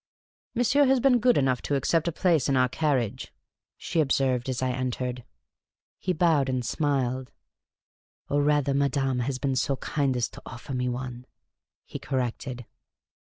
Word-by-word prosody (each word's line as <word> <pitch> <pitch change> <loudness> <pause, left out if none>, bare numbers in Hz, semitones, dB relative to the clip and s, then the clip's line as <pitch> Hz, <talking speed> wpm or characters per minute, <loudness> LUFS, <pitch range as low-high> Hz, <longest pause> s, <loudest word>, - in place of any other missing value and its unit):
" - - -56
Monsieur 255 +4 +3
has 265 0 +4
been 250 -1 +4
good 245 +1 +4
enough 130 -3 +1
to 145 - -1
accept 160 +4 +1
a - - +1
place 165 -5 +2
in 135 - +2
our 125 0 +4
carriage," 130 -5 -1 0.5
she 170 -1 -2
observed, 130 -3 +1
as 125 -2 -2
I 130 -1 0
entered. 125 -1 -3 0.8
He 185 - -1
bowed 155 -6 +2
and 130 -2 -1
smiled. 130 -2 -1 0.5
" - - -68
Or, 145 0 +1
rather, 145 -1 +2
madame 135 -2 +1
has 130 +2 -1
been 135 0 -1
so 135 +2 +1
kind 135 0 -1
as 120 - 0
to - - -12
offer 125 +2 -8
me 125 0 -1
one," 125 0 -6 0.6
he - - -7
corrected. 125 -1 -3
135 Hz, 165 wpm, -26 LUFS, 125-150 Hz, 0.8 s, has